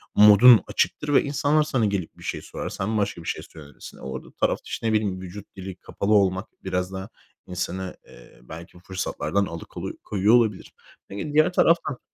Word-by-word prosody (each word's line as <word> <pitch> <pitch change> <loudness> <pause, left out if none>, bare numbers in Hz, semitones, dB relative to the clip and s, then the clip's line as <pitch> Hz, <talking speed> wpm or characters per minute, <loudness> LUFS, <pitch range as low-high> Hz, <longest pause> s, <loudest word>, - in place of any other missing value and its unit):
modun 105 +3 +8
açıktır 150 -1 -1
ve - - +5
insanlar 145 +2 +2
sana 130 -7 0
gelip 100 -5 -3
bir - - -14
şey - - -4
sorar. - - -6
Sen 105 +3 -2
başka 100 -4 -1
bir - - -11
şey - - -2
söylersin. 75 -3 -13
Orada 65 0 -7
tarafta, - - -1
işte, 115 - -4
ne 110 - +1
bileyim, 100 -4 0
vücut 95 +2 -10
dili 95 -1 -7
kapalı 100 +3 -2
olmak 95 -1 +2 0.2
biraz 90 0 -2
daha 95 0 -6 0.4
insanı, 90 +1 -4
eee, - - -17
belki 85 +2 -10
bu - - -15
fırsatlardan 95 0 -2
alıkolu 85 -2 -7
koyuyor 105 +2 +2
olabilir. 110 -5 +1 0.4
Peki, 100 +10 -5
diğer 155 +4 +4
taraftan 165 -7 +2
100 Hz, 180 wpm, -24 LUFS, 90-110 Hz, 0.4 s, modun